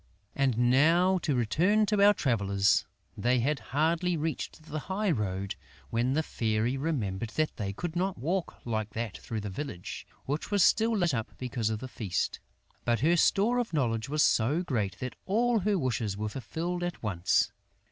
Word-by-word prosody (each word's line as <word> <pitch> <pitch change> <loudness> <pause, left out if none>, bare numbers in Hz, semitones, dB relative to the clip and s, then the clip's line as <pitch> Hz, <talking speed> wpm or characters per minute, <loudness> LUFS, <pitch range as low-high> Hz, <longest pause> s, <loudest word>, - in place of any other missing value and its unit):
And 135 -4 +1
now 170 +7 +4
to 150 -4 0
return 180 - +3
to 205 -1 +2
our 205 0 +7
travellers. 100 - +2 0.3
They 125 +1 +2
had 140 +3 0
hardly 165 +5 +1
reached 155 0 -4
the 155 -1 -5
high 200 +1 +1
road, 100 - -2 0.4
when 120 +3 +1
the 160 +2 +1
Fairy 115 -1 0
remembered 120 -9 -2
that 155 0 0
they 100 -3 -2
could 170 - -5
not 185 +2 0
walk 170 +9 -3
like 110 -3 -3
that 110 -3 -3
through 110 -2 -4
the 100 -1 -5
village, 95 -5 -6 0.2
which 145 +3 -3
was 205 -3 +3
still 225 0 +4
lit 175 -6 +2
up 115 -2 -4
because 120 -3 -2
of 110 - -1
the 130 - -5
feast. 105 -7 -2 0.4
But 120 0 +1
her 165 +5 +4
store 210 +8 +3
of 240 -7 -2
knowledge 120 -5 0
was 150 +1 +2
so 140 +10 +2
great 105 - -1
that 125 -3 -4
all 230 +4 +2
her 205 +1 +1
wishes 120 - -1
were 105 +1 -2
fulfilled 165 +10 -4
at 175 -5 -4
once. 95 -4 +1
135 Hz, 180 wpm, -29 LUFS, 110-175 Hz, 0.4 s, our